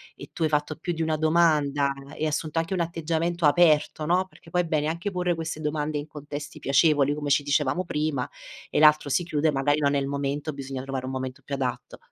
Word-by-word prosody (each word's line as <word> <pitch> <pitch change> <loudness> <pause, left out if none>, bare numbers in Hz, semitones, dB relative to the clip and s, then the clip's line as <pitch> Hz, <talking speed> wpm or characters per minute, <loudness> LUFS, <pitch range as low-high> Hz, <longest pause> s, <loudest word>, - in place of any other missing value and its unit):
e - - -11
tu 165 - -2
hai 155 - +3
fatto 150 0 -1
più 175 +2 -3
di 165 - -4
una 160 -1 0
domanda 150 -3 +3 0.2
e - - -4
hai - - +3
assunto 155 +1 -1
anche 165 +3 -2
un 185 - -1
atteggiamento 165 +1 -1
aperto, 155 0 +4
no, 180 +3 +2
perché 165 - -18
poi 180 +2 +2
è 175 - -3
bene 155 -2 0
anche 170 +5 -2
porre 180 -1 0
queste 165 -1 -4
domande 150 0 -2
in 145 +1 -5
contesti 145 0 -8
piacevoli, 145 0 +3
come 145 -1 -4
ci 145 +1 +3
dicevamo 145 +4 +1
prima, 150 -5 -1 0.4
e - - 0
l'altro 150 -1 +5
si 175 +5 +1
chiude, 155 -2 +1
magari 145 +2 +1
non 140 -1 +2
è - - +3
il 135 - -2
momento, 140 +2 -2
bisogna 135 -1 -5
trovare 135 -1 -4
un - - -4
momento 130 -1 -5
più 140 - -4
adatto. 130 -3 -4
150 Hz, 230 wpm, -26 LUFS, 140-165 Hz, 0.4 s, l'altro